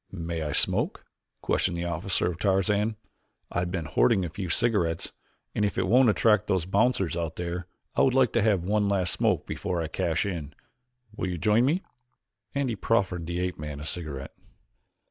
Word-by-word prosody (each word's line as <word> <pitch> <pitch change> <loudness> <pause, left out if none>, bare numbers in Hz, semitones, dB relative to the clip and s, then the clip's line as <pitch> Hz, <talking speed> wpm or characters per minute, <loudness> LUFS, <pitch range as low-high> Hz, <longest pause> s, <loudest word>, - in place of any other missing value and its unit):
"May 85 -2 -4
I 75 -1 -2
smoke?" - - +1 0.4
questioned 90 -2 +1
the 85 - -2
officer 85 +3 0
of 85 - -9
Tarzan. 100 +3 +1 0.6
"I - - 0
have 90 0 -1
been 85 -4 -2
hoarding 95 +5 +3
a - - -4
few 95 +2 -5
cigarettes 95 -8 0 0.4
and 105 - 0
if 100 - 0
it 95 - +1
won't 125 +5 +5
attract 105 -1 +3
those 95 -4 +1
bouncers 100 -2 +1
out 85 -2 -3
there 90 0 -4 0.3
I - - +3
would 130 - +3
like 130 -2 +4
to 115 - +3
have 100 -5 +2
one 105 +2 +1
last 95 -3 +1
smoke - - +1
before 90 - -3
I 80 - -1
cash 80 +3 -1
in. 85 -7 -4 0.6
Will 95 - -2
you 90 - -3
join 105 +8 +3
me?" 165 +8 +1 0.7
and 140 -1 +1
he 115 - -1
proffered 95 -7 0
the 85 0 -2
ape 90 -3 -2
man 75 -1 -5
a - - -7
cigarette. 75 -5 -4
90 Hz, 190 wpm, -27 LUFS, 85-105 Hz, 0.7 s, won't